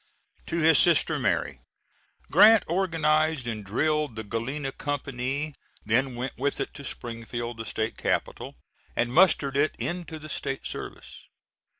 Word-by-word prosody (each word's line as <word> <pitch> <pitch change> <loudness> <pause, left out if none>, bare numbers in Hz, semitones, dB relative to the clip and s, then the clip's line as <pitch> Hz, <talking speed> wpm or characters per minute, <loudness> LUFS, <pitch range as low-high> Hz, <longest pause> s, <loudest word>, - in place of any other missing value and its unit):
[To - - -2
his 160 -2 +5
sister 170 -2 +4
Mary. - - -1 0.7
Grant 220 -2 +7
organized 155 -5 +1
and 110 -3 -4
drilled 150 +6 0
the 110 - -4
Galena 130 +6 -3
company, 140 +1 -3 0.3
then 125 +4 +1
went 125 +1 -4
with 140 +2 0
it - - -3
to 140 - -10
Springfield, 120 -1 -5
the 115 - -6
State 110 +1 -3
capital, - - -2 0.4
and 120 0 0
mustered 155 -5 +4
it 145 +2 +2
into 170 -3 -4
the 155 0 -10
State 135 -2 -4
service. - - -8
140 Hz, 135 wpm, -26 LUFS, 120-155 Hz, 0.7 s, Grant